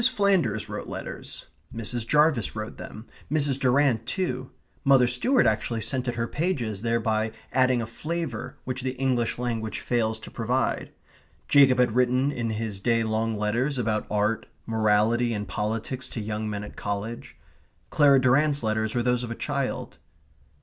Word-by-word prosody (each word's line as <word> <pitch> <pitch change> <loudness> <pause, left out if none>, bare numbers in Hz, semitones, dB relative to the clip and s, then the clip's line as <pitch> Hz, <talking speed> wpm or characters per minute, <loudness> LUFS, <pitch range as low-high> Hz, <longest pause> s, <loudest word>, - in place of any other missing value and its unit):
Flanders 185 - +2
wrote - - -6
letters; - - -6 0.3
Mrs. 115 0 -3
Jarvis 150 -6 +3
wrote 110 0 -5
them; 110 - -9 0.3
Mrs. 145 -3 +1
Durrant 125 -3 +2
too; 130 -5 -2 0.3
Mother 135 -2 +6
Stuart 230 - +2
actually 110 +1 0
scented 125 +2 -2
her 115 0 -1
pages, 125 - -2
thereby 110 -1 0 0.2
adding 130 -2 +3
a - - -3
flavour 130 -1 -4
which 130 0 -3
the 130 0 -3
English 125 -3 0
language 115 -3 -2
fails 110 -2 0
to - - -10
provide; 125 +3 -1 0.6
Jacob 135 -3 +6
had 125 -3 +2
written 125 +2 +3
in 120 -4 -2
his 110 -2 -3
day 115 +2 +2
long 110 0 -1
letters 120 +7 0
about 110 -3 -1
art, 105 +2 0 0.2
morality, 110 +2 +2
and 105 0 -4
politics 115 +5 -3
to - - -5
young 105 0 -3
men 105 -1 -4
at 105 - -9
college. 100 +3 -5 0.5
Clara 140 -3 +6
Durrant's 140 +2 +3
letters 110 0 0
were 120 - +1
those 125 0 +2
of 120 - -5
a 115 - -4
child. 135 - -3
120 Hz, 155 wpm, -26 LUFS, 110-130 Hz, 0.6 s, Mother